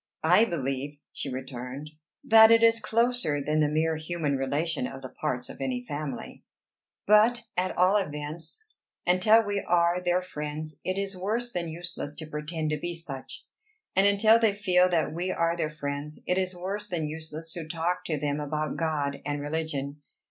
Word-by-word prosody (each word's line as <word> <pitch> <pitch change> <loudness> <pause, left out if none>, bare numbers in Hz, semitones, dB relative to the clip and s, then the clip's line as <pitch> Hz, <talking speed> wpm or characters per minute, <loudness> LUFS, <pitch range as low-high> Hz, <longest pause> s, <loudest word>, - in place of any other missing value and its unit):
"I 180 +7 +6
believe," 140 - -3 0.2
she 140 - -4
returned, 130 +2 -6 0.3
"that 220 0 +8
it 230 0 +6
is 230 0 +5
closer 230 -8 +3
than 150 +2 0
the 150 -1 +3
mere 160 +1 +1
human 155 -2 -2
relation 140 +1 -1
of 135 0 -9
the 130 - -6
parts 130 -4 -3
of - - -10
any 130 -2 -1
family. 145 -2 -6 0.6
But, 220 +3 +5
at 185 +1 -1
all 185 +3 +5
events, 155 - -3 0.4
until 215 +5 +5
we 205 0 -1
are 175 +1 +2
their 180 0 +1
friends 150 -2 -6
it 185 +1 -2
is 195 0 -2
worse 220 +6 -2
than 175 -4 -2
useless 165 -3 -3
to 160 - -7
pretend 155 +1 -4
to 155 - 0
be 175 +2 -4
such, 145 -6 -6 0.5
and 195 +1 +5
until 215 +3 +5
they 220 -3 +2
feel 185 -3 +3
that 165 -3 0
we 175 +3 -2
are 170 -2 +1
their 165 -3 -1
friends 145 0 -5
it 180 +1 +1
is 185 -1 -2
worse 195 +4 -4
than 165 -5 -2
useless 160 +1 -6
to 165 -3 -6
talk 170 +2 -1
to 155 - -1
them 145 0 -1
about 150 +1 -3
God 150 -4 -1
and 145 0 -2
religion. 145 -1 -3
160 Hz, 175 wpm, -27 LUFS, 150-185 Hz, 0.6 s, that